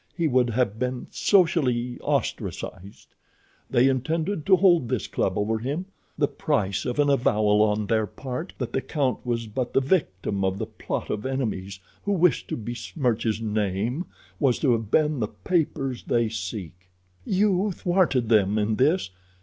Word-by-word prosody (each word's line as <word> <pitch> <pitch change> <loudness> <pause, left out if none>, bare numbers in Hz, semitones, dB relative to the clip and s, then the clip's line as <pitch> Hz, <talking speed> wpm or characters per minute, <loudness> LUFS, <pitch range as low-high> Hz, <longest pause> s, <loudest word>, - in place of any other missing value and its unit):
He 170 -2 +2
would 125 -3 +3
have 110 -2 0
been 125 0 -2
socially 135 - +2
ostracized. 100 +3 -4 0.6
They 125 +2 +4
intended 155 +6 -1
to 190 - +7
hold 175 - +4
this 125 -5 -1
club 95 - -1
over 110 +2 0
him—the 150 - -3
price 105 -11 -1
of 125 - -2
an 145 -1 +3
avowal 105 -6 +3
on 105 0 +2
their 110 0 +1
part 130 - -6
that 125 - -4
the 135 - 0
count 135 -4 -1
was 120 -2 -2
but 120 +3 -3
the - - +5
victim 105 - 0
of 95 0 0
the - - -2
plot - - -5
of 105 - -3
enemies 110 -8 -3 0.2
who 205 - -1
wished 175 -6 +2
to - - -3
besmirch 120 +1 -2
his 110 -1 0
name 110 - -1 0.3
was 135 -5 +3
to 135 - +2
have 115 -3 0
been 150 +1 +2
the 105 - 0
papers 140 - -1
they 120 -2 +1
seek. 95 -4 -6 0.3
"You 200 - +2
thwarted 175 -10 +1
them 105 -2 +3
in 105 0 0
this. 145 - +2
125 Hz, 160 wpm, -25 LUFS, 105-150 Hz, 0.6 s, to